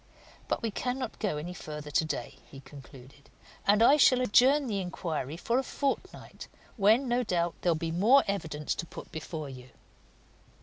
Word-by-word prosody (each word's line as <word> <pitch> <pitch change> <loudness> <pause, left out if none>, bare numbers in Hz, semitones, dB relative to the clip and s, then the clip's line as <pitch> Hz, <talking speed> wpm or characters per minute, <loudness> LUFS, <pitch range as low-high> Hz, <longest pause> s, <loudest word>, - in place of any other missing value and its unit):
But - - -2
we 225 - -1
cannot 255 +5 -4
go 200 -9 -1
any 170 +4 -5
further 150 -3 -8
today," 155 +2 -2
he 135 - -11
concluded, 140 0 -15 0.4
"and 210 +2 +5
I 280 +5 +6
shall 255 -3 +5
adjourn 260 +5 +4
the 210 -5 -2
inquiry 165 -5 -4
for 235 +8 0
a - - -1
fortnight, 275 +1 -4 0.3
when, 225 +5 +3
no 240 +1 +1
doubt, 175 -5 0
there'll 175 -2 +2
be 160 +1 -3
more 220 +11 +5
evidence 160 -7 -2
to 170 - -6
put - - -10
before 155 -1 -6
you." 130 -1 -11
180 Hz, 165 wpm, -29 LUFS, 150-240 Hz, 0.4 s, I